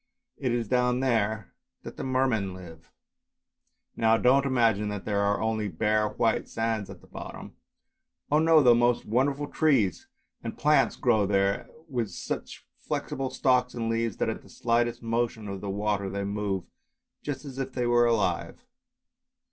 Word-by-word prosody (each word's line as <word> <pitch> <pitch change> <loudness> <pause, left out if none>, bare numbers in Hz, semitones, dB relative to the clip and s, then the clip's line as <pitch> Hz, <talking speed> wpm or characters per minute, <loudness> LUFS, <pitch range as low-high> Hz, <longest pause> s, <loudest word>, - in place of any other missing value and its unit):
It 130 - -1
is 120 -2 -1
down 125 +1 +2
there 110 -5 0 0.3
that - - -8
the - - -6
Mermen 130 -8 0
live. 80 -3 -12 1.0
Now 115 0 +3
don't 135 +4 +4
imagine 115 -5 +2
that 105 -2 -5
there 105 -1 0
are 100 0 +1
only 110 -1 -1
bare 105 +4 +1
white 115 -1 0
sands 115 -3 -2
at - - -11
the - - -19
bottom; - - -9 0.8
oh 150 - +5
no! 160 -1 +5
the 120 -2 +7
most 120 0 +2
wonderful 135 +6 +1
trees 145 - +1 0.4
and 115 - -5
plants 150 +1 +3
grow 110 -5 +2
there, 100 0 +1 0.2
with 120 -7 -2
such - - -6
flexible 135 -1 -3
stalks 125 -1 +1
and 115 -1 -1
leaves, 115 -2 -1
that - - 0
at - - -4
the - - -18
slightest 120 0 0
motion 115 -1 -1
of 100 -1 -5
the 100 - -4
water 100 0 -1
they 100 +1 -3
move 100 -2 -2 0.6
just 145 -1 -5
as 135 -1 -8
if 135 0 -3
they 125 -2 -1
were 120 0 +4
alive. 110 - -1
115 Hz, 165 wpm, -27 LUFS, 105-125 Hz, 1.0 s, the